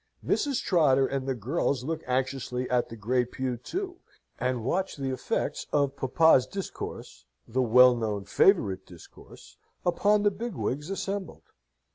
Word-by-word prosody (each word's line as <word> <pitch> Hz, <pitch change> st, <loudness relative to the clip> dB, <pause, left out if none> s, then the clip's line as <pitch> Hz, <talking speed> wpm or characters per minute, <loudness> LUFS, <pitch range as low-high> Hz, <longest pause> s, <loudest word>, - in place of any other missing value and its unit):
Mrs. 280 Hz, -4 st, 0 dB
Trotter 140 Hz, -7 st, +3 dB
and 135 Hz, 0 st, -3 dB
the 135 Hz, -, 0 dB
girls 130 Hz, -, -1 dB
look 160 Hz, +3 st, -3 dB
anxiously 130 Hz, -1 st, -1 dB
at 125 Hz, -1 st, +1 dB
the 115 Hz, -, -8 dB
Great 120 Hz, +3 st, 0 dB
Pew 130 Hz, -1 st, -2 dB
too, 365 Hz, -, -5 dB, 0.4 s
and 125 Hz, -2 st, -1 dB
watch 185 Hz, +8 st, -1 dB
the 135 Hz, -2 st, -3 dB
effects 130 Hz, -, -2 dB
of 140 Hz, -2 st, +1 dB
papa's 135 Hz, 0 st, +4 dB
discourse 195 Hz, -, -7 dB, 0.2 s
the 130 Hz, +3 st, 0 dB
well 125 Hz, +1 st, +6 dB
known 105 Hz, -4 st, -3 dB
favourite 100 Hz, -, +3 dB
discourse 85 Hz, -3 st, -15 dB, 0.3 s
upon 205 Hz, +4 st, +3 dB
the 205 Hz, -, +4 dB
big 230 Hz, 0 st, -5 dB
wigs 150 Hz, +6 st, -3 dB
assembled. 195 Hz, -, -4 dB
130 Hz, 145 wpm, -27 LUFS, 125-175 Hz, 0.4 s, well